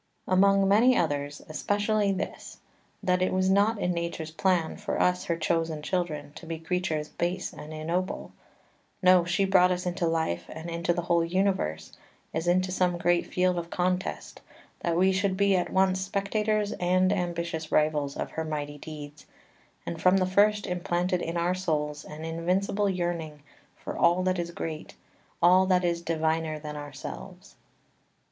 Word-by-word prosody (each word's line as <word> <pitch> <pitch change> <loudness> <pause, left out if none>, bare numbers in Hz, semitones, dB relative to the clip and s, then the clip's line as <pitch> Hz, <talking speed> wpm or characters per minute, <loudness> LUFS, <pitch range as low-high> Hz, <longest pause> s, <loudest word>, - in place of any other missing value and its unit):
Among 195 +1 +4
many 235 +6 +5
others 145 -2 -1
especially 205 +5 0
this, 190 0 -5 0.5
that 180 0 +2
it 185 - +2
was 185 0 +2
not 205 +3 +3
in 180 -3 0
nature's 170 -2 -4
plan 175 -1 +1
for 205 0 -3
us 180 0 +2
her 170 - -1
chosen 165 -2 -1
children 150 -5 -2
to 165 - -11
be 165 0 -3
creatures 160 -2 -2
base 175 +2 -2
and 150 - -9
ignoble, 165 +4 -3 0.7
no, 180 -1 +6
she 180 +3 +1
brought 185 -1 +5
us 180 0 -2
into 175 -1 -1
life, 160 - -1
and 160 +2 -7
into 170 +1 0
the 175 0 -1
whole 170 -1 +2
universe, 170 - -1 0.4
as 160 +2 -2
into 185 +1 +2
some 180 -1 +1
great 175 0 +1
field 180 -1 +1
of 170 0 -7
contest, 180 +1 -2 0.4
that 170 -1 -1
we 190 +2 +4
should 190 0 0
be 200 -1 +3
at 180 - 0
once 190 0 +2
spectators 210 +2 0
and 185 +2 +3
ambitious 170 -4 -3
rivals 150 -2 +1
of - - -4
her 160 - -3
mighty 145 -2 -4
deeds, 150 -1 -9 0.6
and 165 -1 -5
from 185 +1 +5
the 185 - +2
first 205 +2 +3
implanted 180 0 -1
in 165 +1 -3
our 175 +1 +1
souls 150 -5 -2
an 155 +1 -8
invincible 185 +5 0
yearning 170 -5 -3 0.3
for - - -7
all 175 +2 +3
that 185 -1 +1
is 170 0 -2
great, 160 -2 -6 0.5
all 185 +2 +6
that 180 -1 +3
is 170 -1 0
diviner 160 -1 -1
than 150 0 -7
ourselves. 145 -1 -9
175 Hz, 165 wpm, -27 LUFS, 160-185 Hz, 0.7 s, no